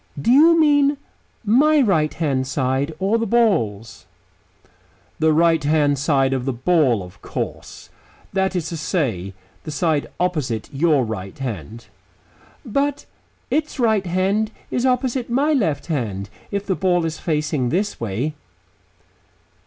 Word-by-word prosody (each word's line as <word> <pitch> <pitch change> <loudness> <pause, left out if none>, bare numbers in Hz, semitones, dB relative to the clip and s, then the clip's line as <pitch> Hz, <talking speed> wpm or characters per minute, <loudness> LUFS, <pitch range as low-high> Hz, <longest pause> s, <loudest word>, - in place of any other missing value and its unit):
Do 185 - +1
you 325 +5 +6
mean 290 -2 +4 0.5
my 295 +8 +4
right 170 - +2
hand 140 -5 -1
side 135 +1 -1
or 200 +5 +1
the 230 - -1
ball's?" 120 - 0 1.1
"The 160 0 +3
right 165 0 +3
hand 145 -2 +2
side 135 -2 +2
of 130 -2 -2
the 135 - 0
ball, 130 - +2
of 90 0 -14
course; - - -6 0.4
that 190 0 0
is 165 -3 -2
to 165 - -5
say, 115 - -2 0.3
the - - -7
side 155 -1 0
opposite 145 -12 -2
your 145 -2 +2
right 95 -4 -6
hand." 115 - -6 0.8
"But 280 +4 -1 0.5
its 305 -2 -1
right 220 -5 +2
hand 190 +5 +1
side - - -28
is 245 +1 +1
opposite 250 -1 0
my 280 +6 +2
left 165 - 0
hand, 105 - -3 0.2
if 200 0 -3
the 195 - 0
ball 180 -2 +1
is 160 0 -4
facing 150 -5 -1
this 200 - -1
way." 115 +7 -2
160 Hz, 140 wpm, -21 LUFS, 135-215 Hz, 1.1 s, you